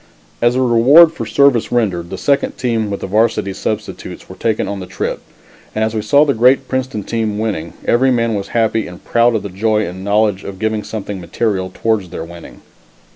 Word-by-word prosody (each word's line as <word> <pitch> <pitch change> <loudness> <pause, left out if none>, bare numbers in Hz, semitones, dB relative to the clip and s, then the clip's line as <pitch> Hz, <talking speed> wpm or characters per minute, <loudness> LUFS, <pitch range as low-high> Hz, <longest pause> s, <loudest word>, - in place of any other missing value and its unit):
As 120 +1 +3
a 130 - +2
reward 135 +8 +6
for 165 - -5
service 140 -5 +3
rendered, 95 -8 0
the - - -6
second 140 -1 +1
team 115 -4 -1
with 100 - -4
the - - -3
Varsity 105 -1 +1
substitutes 105 +2 -5
were - - -10
taken 110 -2 -1
on 100 -1 -4
the 90 - -7
trip, - - -4 0.5
and 110 - +1
as 110 0 -1
we 110 - -1
saw 140 +8 +4
the 140 - +1
great 130 +3 +3
Princeton 130 -5 -3
team 110 -2 -2
winning, 100 -7 -3
every 130 +3 +3
man 115 -2 +1
was 100 -2 -3
happy 110 -1 +1
and 90 0 -12
proud 115 0 +3
of 110 - -1
the 100 - -5
joy 105 +3 0
and 90 +2 -7
knowledge 100 -1 +1
of 100 -1 -7
giving 110 +1 -1
something 105 -3 -6
material 95 +1 -2
towards 110 -3 -1
their 80 - -6
winning. 85 0 -12
110 Hz, 205 wpm, -17 LUFS, 100-120 Hz, 0.5 s, reward